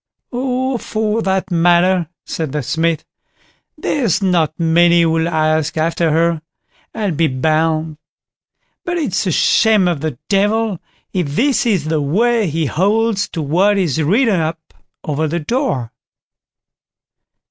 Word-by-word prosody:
"Oh! 255 0 -1
for 220 +1 -1
that 190 -1 -1
matter", 175 +1 +3 0.2
said 160 -5 -4
the 150 -2 -2
Smith, 165 +3 -1 0.7
"there's 235 - 0
not 175 -5 0
many 170 +1 +4
who'll 165 0 +1
ask 155 -1 0
after 165 +1 +1
her, 165 +1 +1 0.5
I'll 210 -4 -1
be 160 +1 +1
bound; 155 +3 0 0.9
but 350 0 -2
it's 215 - -1
a - - +1
shame 215 +3 +3
of 170 -5 -1
the 155 -6 -3
Devil, 205 0 +1 0.3
if 160 -6 -2
this 265 - +1
is 190 -9 +1
the 155 -1 0
way 220 +9 +1
he 160 0 -1
holds 205 - +1
to 165 - -4
what 185 +8 +2
is 160 -6 0
written 205 - +2
up 160 0 -4 0.3
over 155 +1 -1
the 170 +3 -2
door." 155 - -2
170 Hz, 135 wpm, -17 LUFS, 160-210 Hz, 0.9 s, many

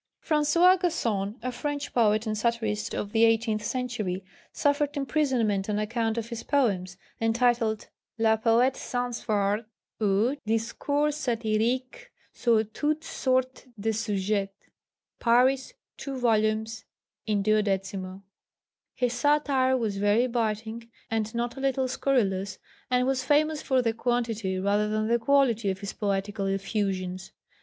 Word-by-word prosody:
François 335 +5 +4
Gacon, 225 - -1
a 255 - -2
French 290 +3 -4
poet 215 -2 +3
and 215 -1 -1
satirist 220 -1 -1
of 205 - -3
the 225 +1 +3
eighteenth 225 -1 +2
century, 215 -6 -3 0.3
suffered 290 0 0
imprisonment 250 -8 0
on 210 - 0
account 225 +1 -1
of 230 0 -3
his 235 -2 -5
poems, 195 -10 0 0.2
entitled 225 -1 +1 0.3
Le 220 -1 +4
Poëte 235 +4 +2
sans 245 -1 -3
fard, 205 0 0 0.4
ou 210 +6 +2
Discours 285 +7 0
satyriques 245 - -1 0.3
sur 230 -3 +2
toutes 300 +8 -2
sortes 260 -3 -1
de 220 +2 0
sujets 205 -2 -1 0.7
(Paris, 255 +3 +3 0.2
2 275 -2 -5
vols., 220 -2 +1 0.4
in 205 -2 +1
12). 195 -2 -1 0.7
His 245 -1 0
satire 275 -2 +2
was 215 -5 -2
very 205 +4 +3
biting 225 -1 -2 0.2
and 220 0 -1
not 240 +2 -2
a - - -5
little 265 -1 +1
scurrilous, 200 -8 0 0.3
and 250 0 +2
was 260 -1 0
famous 300 +3 +2
for 260 -2 +1
the 230 -1 +1
quantity 225 -5 -1
rather 205 +2 +1
than 215 0 0
the 235 +1 +2
quality 235 -4 +2
of 190 0 -3
his 200 - -5
poetical 200 0 -2
effusions. 195 -2 -2
225 Hz, 130 wpm, -27 LUFS, 210-255 Hz, 0.7 s, François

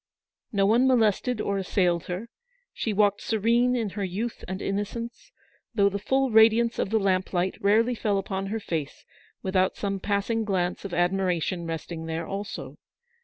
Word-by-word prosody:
No 200 -2 +2
one 235 +6 +4
molested 240 -1 +2
or 200 -1 -1
assailed 180 -3 +1
her 185 +6 -4 0.2
— - - -43
she 225 - -2
walked 205 0 +2
serene 235 +3 +2
in 225 -5 -1
her 205 0 -4
youth 205 +6 -4
and 190 +1 -4
innocence; 230 - -4 0.4
though 200 -2 +4
the 200 +1 -3
full 265 +4 +1
radiance 225 +1 +5
of - - 0
the 220 - +2
lamplight 185 -2 0
rarely 225 +5 +3
fell 210 -3 0
upon 195 0 -3
her 220 +3 -2
face 160 -8 -4 0.4
without 185 0 +1
some 195 -1 -2
passing 205 +3 0
glance 185 -4 -1
of 195 - -5
admiration 175 -1 0
resting 165 0 -5
there 165 +1 -3
also. 200 +3 -6
200 Hz, 165 wpm, -26 LUFS, 185-225 Hz, 0.4 s, radiance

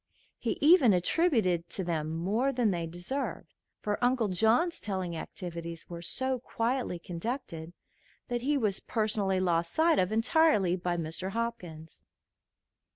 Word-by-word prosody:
He - - -2
even 290 - +7
attributed 185 - +2
to 190 - -3
them 160 -3 -2
more 215 +11 +1
than 240 -5 +1
they 170 -2 -2
deserved, 175 +12 -4 0.3
for 210 +3 -2
Uncle 245 -3 +2
John's 225 - +2
telling 185 -4 -3
activities 170 -1 -7
were 170 0 -6
so 260 +8 0
quietly 235 -4 -2
conducted 170 - -5 0.5
that 240 -1 -2
he 285 +3 +1
was 210 -7 0
personally 210 -4 0
lost 170 -2 +1
sight 325 0 +3
of 185 +2 +1
entirely 225 - +3
by 175 -1 -2
Mr. 170 +4 -3
Hopkins. 180 -9 -5
195 Hz, 135 wpm, -30 LUFS, 175-245 Hz, 0.5 s, even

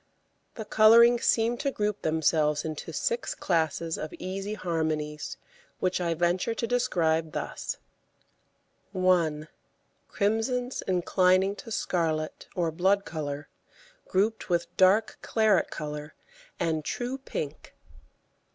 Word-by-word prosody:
The 220 - -6
colourings 235 +3 +6
seem 230 +1 +3
to 280 - -1
group 210 -5 -2
themselves 155 -1 +1
into 155 -2 -5
six 475 0 -1
classes 165 -1 -1
of 155 - -5
easy 195 +3 -4
harmonies, 155 -5 -2 0.4
which 185 0 0
I 170 -1 0
venture 175 +6 0
to 230 - -1
describe 165 -10 +1
thus: - - -4 1.2
1. 170 -5 +2 0.6
Crimsons 225 +5 -1
inclining 185 +1 +3
to - - -9
scarlet 160 -7 -2
or 170 -3 0
blood 190 +4 +2
colour 145 -2 -5 0.6
grouped 210 +4 0
with 170 -1 -1
dark 195 +4 +3
claret 215 -4 +2
colour 150 -1 -6 0.4
and 160 -2 0
true 250 - -3
pink. 150 - -6
180 Hz, 110 wpm, -28 LUFS, 160-215 Hz, 1.2 s, colourings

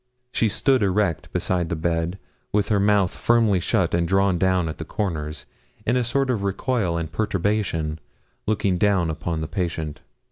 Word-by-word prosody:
She 110 - +2
stood 130 +4 +2
erect 95 -4 0
beside 90 -3 0
the - - -1
bed, 85 +2 -1 0.3
with 105 -1 +1
her 105 -2 +3
mouth 100 -2 +3
firmly 115 -5 +3
shut - - +1
and 85 0 +2
drawn 95 -1 +2
down 95 -2 +2
at 80 - -6
the - - -3
corners, 80 -5 -3 0.4
in 120 - +2
a 125 - +2
sort 135 +3 +1
of 110 -5 -1
recoil 100 -2 0
and 80 -1 -3
perturbation, 95 -5 -1 0.5
looking 100 -4 +1
down 95 -5 +2
upon 80 +1 -3
the 80 - -3
patient. 80 -5 -3
95 Hz, 170 wpm, -23 LUFS, 85-105 Hz, 0.5 s, her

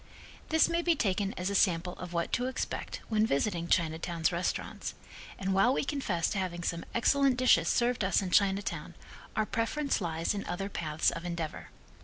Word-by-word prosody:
This 320 0 +5
may 335 0 0
be 340 -1 +3
taken 200 -6 0
as 180 +2 -1
a - - -2
sample 180 -2 +2
of 180 -1 -7
what 170 -1 -1
to 250 +1 +1
expect 260 - -4
when 215 -1 +2
visiting 170 -1 0
Chinatown's 165 0 +1
restaurants, 175 +1 -3 0.4
and 190 0 -1
while 195 +6 +4
we - - 0
confess 265 - -1
to 200 - -1
having 175 -2 -3
some 170 0 -2
excellent 270 +2 +3
dishes 240 -10 +4
served 240 -2 +2
us 190 -1 +3
in 190 -2 -3
Chinatown, 200 0 +1 0.4
our 215 - +2
preference 230 +5 -1
lies 165 0 -1
in 200 - -3
other 195 +3 -3
paths 155 -5 0
of 165 - -6
endeavor. 170 -3 -4
190 Hz, 180 wpm, -30 LUFS, 170-230 Hz, 0.4 s, This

